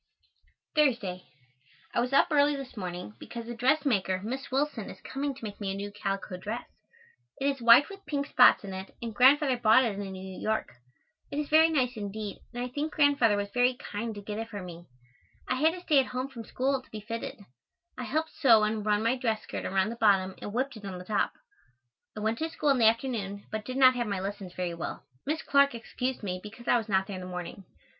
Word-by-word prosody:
Thursday. 235 - +1 0.7
I - - +1
was 245 +2 0
up 275 - +4
early 290 0 +4
this 270 -3 -8
morning 180 - -5
because 235 -1 -8
a 240 - -4
dressmaker, 240 -7 +1
Miss 260 +5 -4
Willson, 270 -5 -1
is - - -10
coming 275 0 -3
to 255 - -14
make 210 -1 -7
me 200 - -2
a - - -3
new 200 +1 -5
calico 195 -2 -4
dress. 215 +6 -5 0.7
It 275 - -2
is 275 -2 0
white 235 +4 +8
with 395 0 -11
pink 285 -2 -1
spots 250 -5 +6
in 195 -1 -6
it 190 +1 -8
and 230 -2 -5
Grandfather 265 +3 +5
bought 235 +2 +5
it 205 -3 -2
in 195 -1 -5
New 190 0 -8
York. 220 - -1 0.6
It 285 - -5
is 300 -1 -2
very 320 +1 +6
nice 255 -6 0
indeed 205 0 -5
and 245 0 -4
I 250 - -4
think 295 +4 -3
Grandfather 280 -8 +4
was 200 0 -3
very 250 +2 +3
kind 225 -1 -5
to 205 - -8
get 210 +1 -5
it 225 0 -5
for 205 -4 -6
me. 175 -1 -10 0.6
I - - +1
had 315 +4 +3
to 360 - -8
stay 310 -5 +4
at 265 - +1
home 255 +2 -3
from 235 -4 -9
school 265 +3 0
to - - -24
be 215 - -7
fitted. 230 +5 -5 0.6
I 250 - -5
helped 315 +6 -1
sew 225 -6 +5
and 215 0 0
run 210 0 +1
my 230 +3 +2
dress 225 -4 -1
skirt - - -5
around 190 +1 +1
the - - -5
bottom 195 -4 +3
and 205 - -5
whipped 260 +2 -2
it 210 - -13
on 190 -2 -5
the 180 - -9
top. 210 +2 0 0.8
I - - -4
went 220 +2 0
to 320 - -1
school 300 -2 -1
in 270 -2 +4
the 220 -1 +7
afternoon, 220 -4 -3
but 215 -1 -4
did 255 +1 -4
not 260 -1 +7
have 240 -2 -2
my 200 -2 -2
lessons 195 -1 -5
very 180 -2 -2
well. 170 - -5 0.2
Miss 315 +2 -1
Clark 280 -2 +4
excused 250 +2 -4
me 185 -2 -3
because 220 +4 -11
I - - +5
was 225 -1 -7
not 190 -1 +2
there 195 -1 -6
in - - -7
the 180 - -7
morning. 180 +1 -7
230 Hz, 230 wpm, -29 LUFS, 200-270 Hz, 0.8 s, white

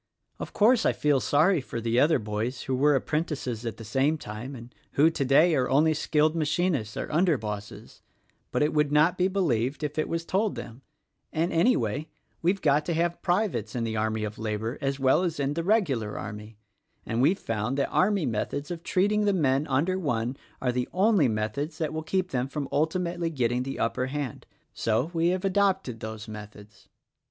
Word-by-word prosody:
"Of - - -6
course, 225 +2 +4
I - - +3
feel 145 -2 +2
sorry 155 - +3
for 120 - -5
the 115 +1 +1
other 155 +4 +4
boys 110 +3 -3
who 130 - -1
were 145 +3 +4
apprentices 135 -6 -2
at 110 -1 -4
the 115 - -9
same 135 +8 +1
time 120 +2 -7
and 120 0 -11 0.2
who, 155 +4 +5
today, 150 +3 +4
are 130 -4 +1
only 155 +4 +4
skilled 155 +1 +1
machinists 150 - 0
or - - -4
under 170 -1 +3
bosses; 105 -2 -7 0.5
but - - +1
it 150 - +1
would 150 -1 +2
not 155 +4 +4
be 180 0 +2
believed 150 - 0
if 150 +1 -2
it 155 - -1
was 165 0 -2
told 200 +4 0
them, 115 +3 -8 0.5
and, 165 +4 0
anyway, 155 - +1 0.3
we've 185 +4 +1
got 145 0 +3
to 170 - 0
have 170 +1 0
privates 175 - 0
in 120 - -1
the 110 -1 -2
army 110 0 -1
of 105 0 -5
labor 110 +3 -3
as 135 0 -1
well 135 +5 +4
as 170 -4 -2
in 140 0 0
the 165 +2 -2
regular 150 - +1
army, 105 +1 -8 0.5
and 115 +2 -1
we've 165 +9 +4
found 115 - -2
that 140 - 0
army 195 -3 +2
methods 140 +7 -3
of 170 -1 -5
treating 205 +4 +1
the 205 - +3
men 145 -4 +1
under 160 +8 +1
one 125 -6 -1 0.2
are 125 - 0
the 125 0 -2
only 195 - +3
methods 115 +8 -2
that 155 -2 -2
will 160 - -2
keep 180 +3 -1
them 125 0 -1
from 140 0 -4
ultimately 170 +2 0
getting 125 -5 0
the 135 +1 -4
upper 125 +3 -1
hand: 140 -3 -5 0.2
— - - -46
so 115 +9 0
we 165 0 +2
have 185 +2 0
adopted 190 - +1
those 110 -1 -7
methods." 105 -1 -11
145 Hz, 195 wpm, -27 LUFS, 115-170 Hz, 0.5 s, who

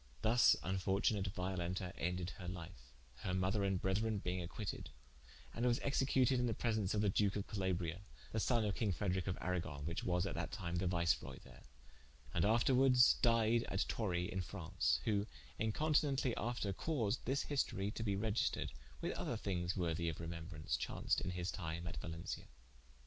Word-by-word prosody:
Thus 115 +2 +6
infortunate 95 +2 +1
Violenta 90 -1 -2
ended 90 +1 -2
her 90 - -6
life, 85 -9 -8 0.3
her 90 +9 -2
mother 95 +3 +1
and 95 -2 +1
brethren 105 +4 +1
being 90 -1 -2
acquited: 85 -5 -5 0.6
and 115 - -3
was 120 -1 +3
executed 135 -2 +3
in 125 - +2
the 115 - 0
presence 110 -4 0
of 105 - +2
the 105 - +3
duke 100 +1 +2
of 100 - -2
Calabria, 95 -3 -2 0.3
the 110 - 0
sonne 115 0 +2
of 105 - 0
king 105 -1 0
Frederic 95 +1 -1
of 90 - -1
Aragon: 85 -6 -2
which 85 +2 -3
was 90 -1 +1
that 95 - -3
time 90 -4 -3
the 90 +1 +1
Viceroy 85 -2 +1
there, - - -15 0.7
and 85 - +2
afterwardes 125 +4 +5
died 115 0 +4
at 95 - +1
Torry 90 -6 0
in 95 - -1
Fraunce: 90 -1 0
who 105 -1 +1 0.3
incontinently 140 +2 +2
after 115 -4 -1
caused 120 - -1
this 135 +2 +1
historie 105 -8 -1
to 110 - -5
be 100 -3 0
registred, 105 +2 0 0.3
with - - -1
other - - -2
thinges 90 -2 -2
worthy 85 -1 0
of 80 - -4
remembraunce, 80 -5 -4
chaunced - - 0
in - - -2
his 90 0 -2
time 85 -2 -4
at 85 - -5
Valencia. 85 0 -5
95 Hz, 170 wpm, -38 LUFS, 90-110 Hz, 0.7 s, Thus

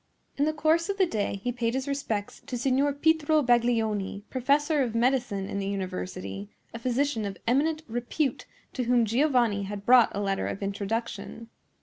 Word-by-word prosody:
In 285 - +1
the 310 - +2
course 315 +4 +1
of 395 - -1
the 385 - +4
day 205 - -2
he 245 - 0
paid 240 0 -1
his 265 +1 -2
respects 230 -8 -3
to 250 - -3
Signor 270 +3 +2
Pietro 310 +1 +2
Baglioni, 225 -5 +1
professor 285 +4 +2
of 235 -4 -1
medicine 235 -5 +1
in 200 - -3
the 195 - -2
university, 100 - -4 0.2
a 230 - -6
physician 255 0 0
of 200 -2 -4
eminent 310 +6 +1
repute 240 +4 -2 0.3
to 250 - -2
whom 240 -1 +3
Giovanni 240 -3 +2
had 200 0 -6
brought 245 -2 +7
a - - -1
letter 195 -1 -1
of 200 - -4
introduction. 225 +3 -4
240 Hz, 175 wpm, -27 LUFS, 205-280 Hz, 0.3 s, brought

